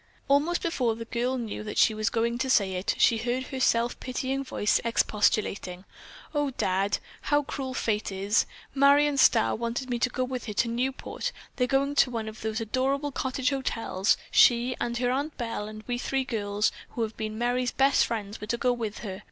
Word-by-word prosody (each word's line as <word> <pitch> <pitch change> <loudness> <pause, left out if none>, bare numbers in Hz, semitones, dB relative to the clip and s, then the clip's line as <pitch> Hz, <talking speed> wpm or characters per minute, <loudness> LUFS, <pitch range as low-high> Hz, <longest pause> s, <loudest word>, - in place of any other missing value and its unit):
Almost 295 +5 +2
before 250 -9 0
the 230 0 -7
girl 245 +3 -1
knew 225 -4 -4
that 210 - -6
she 220 - +5
was 215 -1 0
going 235 +1 0
to 265 - -1
say 200 -6 +3
it, 185 +1 -1
she 230 - +4
heard 245 +3 -1
her 265 0 -6
self 235 -1 +2
pitying 260 +2 -2
voice 210 -5 +1
expostulating, 205 -4 0 0.5
"Oh, 290 -1 +1
Dad, 190 +2 +1 0.3
how 290 0 +3
cruel 265 -2 -5
fate 210 -4 -1
is! 195 +3 +1 0.3
Marion 285 +1 +5
Starr 235 -4 +4
wanted 235 +3 -3
me 240 - 0
to 250 - +2
go 255 +1 -2
with 255 -1 -4
her 210 - -3
to 220 - +1
Newport. 250 +3 -2 0.3
They're 250 -1 +2
going 275 +2 +1
to - - +5
one 225 -3 -4
of 220 0 -8
those 220 +1 -2
adorable 270 +6 -1
cottage 260 0 -1
hotels, 225 -6 0
she 245 +1 +5
and 235 0 -1
her 245 0 +1
Aunt 285 +4 -2
Belle, 230 -4 -3
and 215 0 -9
we 245 -1 -2
three 270 +1 -1
girls 210 -4 0 0.2
who 235 - -3
have 220 0 -4
been 215 0 -4
Merry's 245 +1 0
best 275 0 +3
friends 210 -3 -4
were 210 - -6
to 235 - -1
go 250 +1 +2
with 225 -3 -4
her. 190 -2 -5
240 Hz, 200 wpm, -27 LUFS, 215-260 Hz, 0.5 s, she